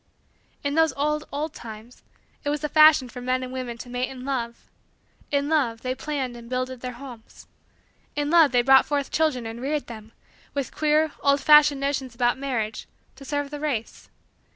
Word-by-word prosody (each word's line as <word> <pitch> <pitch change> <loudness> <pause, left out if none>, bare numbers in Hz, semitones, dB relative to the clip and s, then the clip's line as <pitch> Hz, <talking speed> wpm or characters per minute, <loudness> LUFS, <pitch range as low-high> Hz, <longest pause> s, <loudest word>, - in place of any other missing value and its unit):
In 285 0 -1
those 320 -2 +3
old, 300 +2 -1
old, 295 +2 -3
times, 225 +2 -10
too, - - -27 0.4
it - - 0
was 295 0 -1
the 300 - -2
fashion 305 -4 +6
for 245 +1 -9
men 255 +1 -1
and 255 0 -7
women 250 -2 -5
to 240 - -9
mate 250 +1 -2
in 255 -1 -9
love. 235 -4 -3 0.6
In 285 0 0
love, 260 -8 +1
they 255 0 -2
planned 265 -3 -4
and 235 0 -11
builded 255 0 -3
their 250 -1 -5
homes. 240 -3 -12 0.7
In 290 0 -1
love, 330 -4 +6
they 245 -1 +3
brought 265 +1 +6
forth 285 -2 -1
children 305 -7 +1
and 225 +1 -6
reared 290 +2 -2
them, 220 -2 -10 0.4
with 280 -2 -3
queer, 310 0 +2
old 280 0 +3
fashioned 300 -1 +6
notions 270 -3 -2
about 245 +1 +1
marriage, 235 -6 -3 0.3
to - - -13
serve 290 0 -3
the 295 - -5
race. 275 -7 -4
270 Hz, 190 wpm, -24 LUFS, 245-295 Hz, 0.7 s, fashion